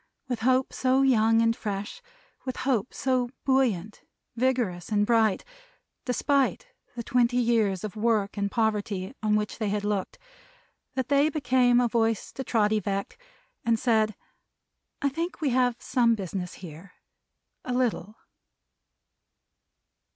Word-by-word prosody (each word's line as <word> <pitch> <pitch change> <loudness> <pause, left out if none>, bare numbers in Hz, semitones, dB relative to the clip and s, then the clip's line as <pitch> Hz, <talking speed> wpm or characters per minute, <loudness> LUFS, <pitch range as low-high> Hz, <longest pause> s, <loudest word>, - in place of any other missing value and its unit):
With 245 -2 -2
Hope 255 +2 +2
so 260 +1 +2
young 225 -3 +4
and 230 0 +2
fresh; 205 - -5 0.4
with 255 -1 -5
Hope 250 -4 0
so 255 -2 0 0.2
buoyant, 225 -7 +1 0.3
vigorous 235 -9 0
and 205 -1 +2
bright, 220 -3 +2 0.6
despite 275 - 0 0.3
the 235 - -4
twenty 245 +1 +2
years 225 -6 +1
of 215 -1 -5
work 215 -2 0
and 200 -1 -1
poverty 210 -2 -1
on 215 -1 +2
which 210 +1 -2
they 215 -3 -1
had 205 0 -1
looked; 205 -2 -2 0.8
that 260 -2 -2
they 285 +2 +4
became 250 -4 +3
a 245 - +3
voice 225 -2 0
to 265 - -6
Trotty 215 -3 +2
Veck, 200 - -4 0.4
and 230 -2 +2
said: 220 -3 +1 0.9
"I 280 - +3
think 330 +7 -4
we 300 -4 0
have 245 -1 +1
some 240 -3 +2
business 185 -3 -5
here 175 +1 -11 0.7
a 255 - -5
little!" 235 -5 -1
230 Hz, 135 wpm, -27 LUFS, 210-255 Hz, 0.9 s, young